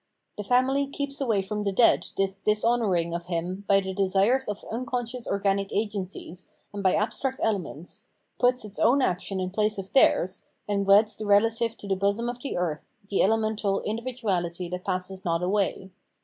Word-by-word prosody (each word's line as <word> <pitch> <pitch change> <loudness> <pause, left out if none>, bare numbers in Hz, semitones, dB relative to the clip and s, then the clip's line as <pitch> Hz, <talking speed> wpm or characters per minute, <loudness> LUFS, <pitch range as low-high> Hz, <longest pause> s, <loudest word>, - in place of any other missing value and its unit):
* - - -51
The - - -2
family 260 +5 +2
keeps 280 0 -4
away 220 -7 +1
from 210 +2 -3
the 200 - 0
dead 230 +5 +4
this 195 0 +1
dishonouring 210 -5 +1
of 170 0 -4
him 180 +3 -3
by 195 0 +5
the 190 0 -4
desires 200 +7 +2
of 210 -1 -5
unconscious 245 0 -3
organic 195 0 0
agencies 195 -4 -3 0.3
and 205 - -4
by 190 -1 +3
abstract 240 +5 -1
elements, 195 - -3 0.3
puts 250 -2 +2
its 205 -1 -9
own 255 +4 +4
action 190 0 -1
in 185 0 -2
place 210 +1 +1
of 195 -1 -7
theirs, 190 -8 +4 0.3
and 200 -1 0
weds 210 +2 +5
the 215 - -6
relative 225 +3 +3
to 205 - -9
the 195 - +1
bosom 200 +5 0
of 245 0 -6
the 275 - -3
earth, 160 -4 -3
the 200 - +2
elemental 215 -1 +1
individu 235 +3 -4
ality 175 -3 -1
that 180 0 -5
passes 185 0 -3
not 170 -2 0
away. 190 0 0
205 Hz, 180 wpm, -26 LUFS, 190-230 Hz, 0.3 s, by